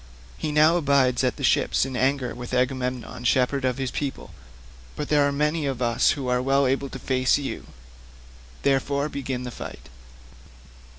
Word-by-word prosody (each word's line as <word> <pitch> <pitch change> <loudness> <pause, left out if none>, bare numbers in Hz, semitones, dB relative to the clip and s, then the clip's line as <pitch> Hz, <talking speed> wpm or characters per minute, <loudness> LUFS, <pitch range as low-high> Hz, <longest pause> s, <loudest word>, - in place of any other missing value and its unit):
He 150 - -3
now 155 +3 +5
abides 135 -5 +2
at 125 - +1
the - - -8
ships - - +2
in 135 -1 -5
anger 130 -1 0
with 125 +2 -5
Agamemnon 125 -1 -2
shepherd 130 +2 +2
of 130 0 0
his 135 -2 -2
people, 140 -8 -4 0.6
but 150 - -4
there 145 -1 +4
are - - 0
many 150 +1 0
of 135 -3 -3
us 120 -2 +2
who 135 -3 -4
are 125 0 +1
well 135 +1 +2
able 135 +1 0
to 135 - -7
face 130 0 +1
you; 140 -2 -5 1.0
therefore 140 +1 +1
begin 135 -3 -4
the 125 - -5
fight." - - -9
135 Hz, 170 wpm, -24 LUFS, 125-140 Hz, 1.0 s, now